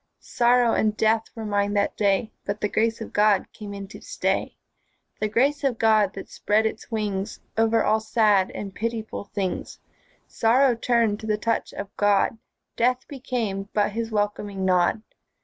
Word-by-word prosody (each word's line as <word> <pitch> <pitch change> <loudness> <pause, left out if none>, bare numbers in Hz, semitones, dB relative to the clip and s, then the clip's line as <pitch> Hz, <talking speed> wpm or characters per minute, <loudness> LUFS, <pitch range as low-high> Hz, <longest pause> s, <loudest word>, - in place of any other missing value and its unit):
Sorrow 240 -1 +3
and 215 -1 +1
death 220 0 +2
were 225 -1 -6
mine 205 -1 0
that 200 0 +1
day, 205 +1 +1
But 200 +1 -3
the 210 - 0
Grace 225 +2 0
of 225 - -7
God 210 -2 +3
came 210 -2 -8
in 200 -1 -7
to - - -11
stay; - - -2 0.6
The 215 - 0
Grace 275 +7 +1
of 265 -4 +1
God 215 -3 +3
that 195 - -7
spread 215 +2 +1
its 220 - -4
wings 210 -2 -3 0.2
Over 225 0 +3
all 215 +1 +3
sad 215 -3 +2
and 200 -2 -7
pitiful 225 -1 -4
things. 195 -3 -4 0.5
Sorrow 250 +3 +3
turned 230 -2 +1
to 220 - -7
the 210 -1 +1
touch 230 +2 -1
of 200 0 -7
God, 205 +2 +2 0.4
Death 250 +2 +1
became 230 -8 -3
but 210 0 +2
His 225 +1 -3
welcoming 205 -2 -2
nod. 185 +3 +2
215 Hz, 165 wpm, -24 LUFS, 205-230 Hz, 0.6 s, Sorrow